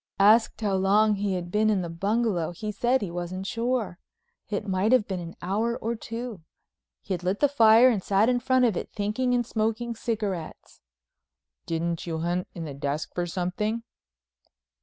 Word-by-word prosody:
Asked 215 +4 +4
how 205 -2 0
long 205 +3 +3
he 200 -1 -1
had 175 -1 -5
been 215 +2 +2
in 200 -4 +1
the - - -3
bungalow 195 0 0
he 210 +5 -4
said 240 +4 +1
he 185 - -4
wasn't 175 +2 -4
sure—it 220 -2 -4
might 190 +3 +1
have 255 -5 +4
been 190 -2 -3
an 170 -1 -8
hour 220 +6 0
or 230 +2 -2
two. 230 -3 -6 0.6
He - - -3
had 175 - -3
lit 185 +3 -1
the 290 - +5
fire 230 -3 +6
and 225 -6 +2
sat 200 +2 +3
in 250 0 +2
front 255 +1 +3
of 225 -5 +1
it - - -4
thinking 220 +5 0
and 240 -1 +1
smoking 225 +1 -1
cigarettes. 210 -7 -4 0.9
"Didn't 165 +1 -2
you 165 -1 -2
hunt 175 +2 -1
in 170 -2 -5
the 145 - -6
desk 140 +2 -3
for 175 0 -2
something?" 195 +6 -2
205 Hz, 180 wpm, -26 LUFS, 180-230 Hz, 0.9 s, fire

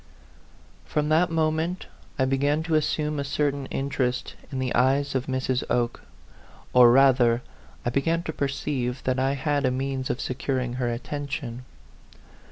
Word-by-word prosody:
FROM 150 0 -1
that 165 +3 +4
moment 160 +2 0 0.3
I 130 - +2
began 140 +4 +1
to 165 0 -2
assume 150 -1 +1
a - - -1
certain 140 -1 -1
interesj; 135 -2 -2 0.2
in 135 - -4
the 130 -1 -1
eyes 135 +3 +2
of 130 -1 -1
Mrs. 130 -1 0
Oke; 120 -1 0 0.7
or, 125 -1 +8
rather, 125 -2 +5 0.4
I 120 - +1
began 165 +6 +1
to 160 - -4
perceive 135 -3 -2
that 130 0 0
I 135 +1 +2
had 145 +1 0
a 130 - +3
means 130 0 -2
of - - -1
securing 130 -1 -2
her 120 -1 +1
attention. 135 -1 -5
135 Hz, 150 wpm, -25 LUFS, 125-145 Hz, 0.7 s, or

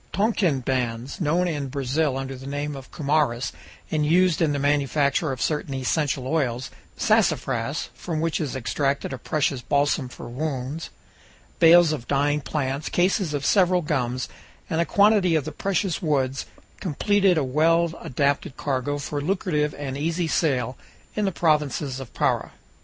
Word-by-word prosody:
Tonquin 195 - +1
bans, 125 +2 -2
known 170 +3 +2
in 145 -5 -2
Brazil 140 +1 0
under 135 0 -4
the 130 +1 -9
name 145 +1 -3
of 135 -1 -10
"cumarus," 140 -5 0 0.4
and 155 -1 +1
used 175 +2 +3
in 160 -3 +3
the 145 - 0
manufacture 145 +1 +1
of 130 - -5
certain 150 -2 -1
essential 135 0 0
oils; 130 -5 -1 0.3
sassafras, 150 - +1
from 165 -3 -4
which 165 +1 0
is 145 -4 -3
extracted 135 +2 -1
a 130 - -5
precious 140 -2 0
balsam 140 0 +1
for - - -9
wounds; 135 +3 -4 0.7
bales 170 0 +7
of 145 -6 -4
dyeing 145 +1 +1
plants, 140 0 -2
cases 180 -3 +1
of 140 -1 -3
several 180 -3 +3
gums, 130 -5 -1 0.4
and 165 0 +2
a - - +1
quantity 200 -4 +4
of 155 0 -2
precious 195 -1 0
woods, 135 -5 0 0.3
completed 195 +2 +2
a 155 - +2
well 165 +5 +2
adapted 140 +1 -1
cargo 140 +1 -1
for 145 0 -3
lucrative 150 -3 0
and 140 -1 -4
easy 165 +3 0
sale 130 -7 0 0.4
in 210 - 0
the 195 - +1
provinces 150 -5 0
of 135 -3 -8
Para. - - 0
145 Hz, 150 wpm, -24 LUFS, 135-165 Hz, 0.7 s, bales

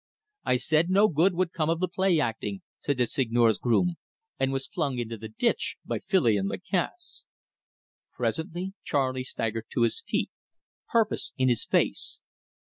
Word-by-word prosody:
"I 125 - +3
said 155 +7 +2
no 200 +3 +5
good 175 +2 +3
would 180 -1 +1
come 155 -2 0
of 165 0 +1
the 185 - +1
play 185 -1 +2
acting," 110 -7 -2 0.2
said 140 -3 -1
the 125 - +3
Seigneur's 115 -3 +2
groom, 170 +9 +2 0.4
and 135 - +2
was 135 0 -1
flung 145 -7 -2
into 115 -1 -3
the 110 0 -7
ditch 110 - 0
by - - -2
Filion 110 - +2
Lacasse. 195 - -3 0.9
Presently 175 +3 -2
Charley 130 -2 0
staggered 115 -3 -3
to 120 - +2
his 460 - +1
feet, - - -1 0.6
purpose 225 -2 +1
in 130 -1 +3
his 120 - +1
face. - - 0
140 Hz, 155 wpm, -27 LUFS, 120-180 Hz, 0.9 s, no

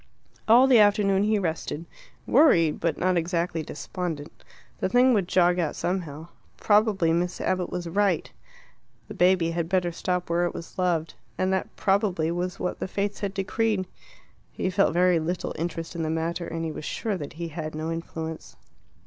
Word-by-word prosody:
All 240 +4 +7
the 255 -4 +6
afternoon 205 -2 +4
he 215 0 +2
rested 165 -3 -3 0.4
worried, 175 - +4
but 165 - -1
not 185 0 +1
exactly 170 0 -1
despondent. 160 0 -6 0.4
The - - 0
thing 250 +4 +5
would 200 -5 +1
jog 180 -1 +3
out 165 -4 -1
somehow. 165 -3 -3 0.3
Probably 205 -6 +3
Miss 175 +1 -1
Abbott 185 -1 -1
was 175 -1 -4
right. 195 -1 0 0.8
The - - -8
baby 180 -2 +3
had 165 -1 -2
better 180 -2 +1
stop 180 +1 -2
where 175 +1 +1
it - - -6
was 170 - -9
loved. 170 -3 0 0.2
And 185 +1 +1
that, 190 - -2
probably, 190 -5 +1
was 180 +2 -3
what 180 - -3
the - - -3
fates 200 +1 -2
had 200 -1 -3
decreed. 200 0 0 0.7
He 190 - -2
felt 185 -2 +2
little 175 -1 +1
interest 165 +1 -4
in 170 - -3
the 160 - -1
matter, 165 +2 -2
and 165 0 -4
he 160 - -3
was 155 - -7
sure 220 -3 -2
that 145 -4 -7
he 170 0 -5
had 155 -1 -6
no 160 +1 -3
influence. 160 -1 -6
175 Hz, 175 wpm, -26 LUFS, 165-195 Hz, 0.8 s, All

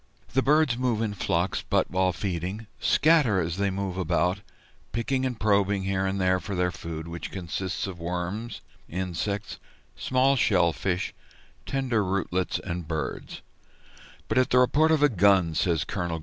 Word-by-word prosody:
The 135 - +3
birds 145 -3 +3
move 125 -4 +1
in 105 -2 -2
flocks, 90 -1 -1
but, - - 0
while 95 0 +2
feeding, 95 +3 -4
scatter 150 - +4
as 85 0 -2
they 100 0 +1
move 95 -1 -3
about, 90 +2 +1 0.5
picking 130 +3 0
and 125 -3 -5
probing 100 -2 +2
here 95 0 0
and 95 +1 -2
there 95 0 +2
for 100 +1 -5
their 90 0 +1
food, 80 -1 -7
which 85 -1 -6
consists 95 0 -3
of 95 -3 -7
worms, 90 +7 -4 0.3
insects, 95 +3 -3 0.4
small 130 +2 +2
shell 85 -9 +3
fish, 90 0 -2 0.5
tender 125 -6 0
rootlets, 95 -1 -1
and 85 -3 -5
birds; 80 -4 -4 0.8
"but - - +2
at 130 - +2
the 125 - +3
report 145 +5 +4
of 155 -2 +3
a - - +8
gun," 95 - +4
says 80 -1 +1
Col. 85 -2 -3
95 Hz, 160 wpm, -26 LUFS, 90-115 Hz, 0.8 s, a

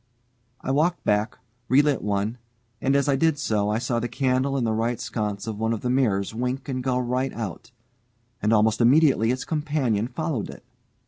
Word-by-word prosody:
I - - -2
walked 165 +6 +1
back, 105 +1 0 0.3
relit 145 0 +4
one, 105 +3 -1 0.4
and 135 +1 +2
as 140 +1 +2
I 140 - +3
did 160 +2 +2
so, 105 -7 0
I 105 - +1
saw 120 0 -1
the 120 - -2
candle 130 +2 0
in 130 - 0
the 110 -1 +1
right 115 +1 -1
sconce 105 -2 -3
of 110 -2 -5
one 110 +1 +1
of 110 - -4
the 125 - -1
mirrors 110 -7 +1
wink 125 +3 -3
and 130 -2 -3
go 125 -1 +1
right 125 +2 -1
out, 110 0 -6 0.7
and 105 - +1
almost 110 +1 +3
immediately 130 -2 +4
its 130 +1 -1
companion 145 -8 0
followed 155 -5 -3
it. - - -11
125 Hz, 190 wpm, -24 LUFS, 110-135 Hz, 0.7 s, relit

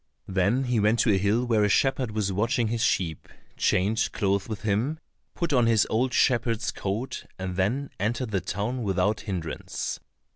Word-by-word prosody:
Then 100 +8 +1
he 125 -3 +1
went 105 +2 +3
to 110 - +3
a - - +3
hill 105 +5 +1
where 110 -3 +2
a 105 - +3
shepherd 135 +2 +2
was 105 -2 -1
watching 115 +3 +1
his 115 0 -1
sheep, 85 -8 0 0.3
changed 105 +4 +1
clothes 100 +1 0
with 110 0 -5
him, 110 +9 0 0.4
put 170 -3 -1
on 120 -3 +4
his 115 -2 +4
old 125 +4 +1
shepherd's 115 -4 +2
coat, 105 +6 -4
and 95 -1 -4
then 120 +10 0
entered 115 +3 -1
the 95 -2 0
town 105 +8 -3
without 100 0 +1
hindrance. 90 -7 -4
110 Hz, 175 wpm, -26 LUFS, 100-120 Hz, 0.4 s, on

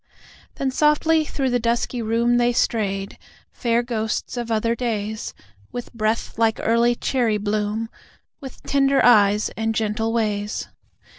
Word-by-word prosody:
Then 270 -1 -1
softly 305 +3 +3
through 270 -3 -2
the 245 - +2
dusky 235 +1 -1
room 230 +2 +1
They 240 0 +2
strayed, 195 -4 -1 0.3
fair 235 -1 0
ghosts 225 -2 -3
of 240 -1 -4
other 230 +1 +1
days, 220 -3 -3 0.4
With 245 - -7
breath 225 0 -2
like 225 -1 +2
early 235 +1 +2
cherry 235 -4 0
bloom, 210 +2 -2 0.5
With 265 -2 -11
tender 275 -1 +2
eyes 210 -3 +5
and 225 0 -1
gentle 220 +1 -1
ways. 210 -2 -2
230 Hz, 135 wpm, -22 LUFS, 215-245 Hz, 0.5 s, eyes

